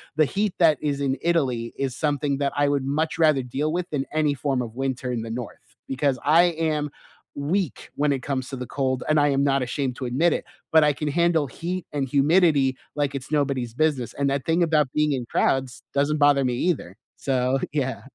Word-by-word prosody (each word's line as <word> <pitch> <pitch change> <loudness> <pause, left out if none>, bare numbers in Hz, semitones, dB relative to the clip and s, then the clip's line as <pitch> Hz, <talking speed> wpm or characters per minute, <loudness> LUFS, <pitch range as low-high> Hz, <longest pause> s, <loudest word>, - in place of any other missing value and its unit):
the 155 0 +4
heat 205 -1 +1
that 160 -4 +5
is 145 -2 -1
in 135 -1 0
Italy 130 -9 0
is 135 -2 -2
something 145 -2 0
that 140 -1 0
I 145 0 +2
would 140 -2 0
much 155 +6 -1
rather 155 -5 +4
deal 140 +5 -2
with 180 0 -2
than 140 -3 -2
any 155 -2 +2
form 135 -1 -1
of 115 -2 -6
winter 130 -1 -2
in 115 -2 -2
the 115 - -6
north, 115 - -11 0.3
because 135 0 0
I 160 +4 +5 0.3
am 150 -1 -1 0.5
weak 165 +2 -2
when 145 0 +1
it 135 -2 -2
comes 130 -2 -3
to 135 - -5
the 125 - -5
cold, 130 -2 -1
and 155 0 +3
I 145 0 +3
am 140 0 +2
not 135 -1 +2
ashamed 125 +1 -2
to 130 - -4
admit 145 +8 +2
it, - - -2 0.3
but 160 -1 +6
I 150 - +4
can 145 +2 -4
handle 170 0 +2
heat 175 +6 -5
and 145 -2 0
humidity 145 -1 +3 0.2
like 145 -1 0
it's 135 +1 -6
nobody's 135 -6 0
business, 145 -5 0
and 140 0 0
that 140 -1 -1
thing 165 +2 +2
about 155 -5 +2
being 150 -1 +2
in 130 -2 -2
crowds 135 +2 0
doesn't 145 +2 +1
bother 145 -2 +4
me 125 -1 0
either, 125 - -1 0.2
so, 130 0 0
yeah. 130 -5 -1
140 Hz, 215 wpm, -24 LUFS, 130-155 Hz, 0.5 s, but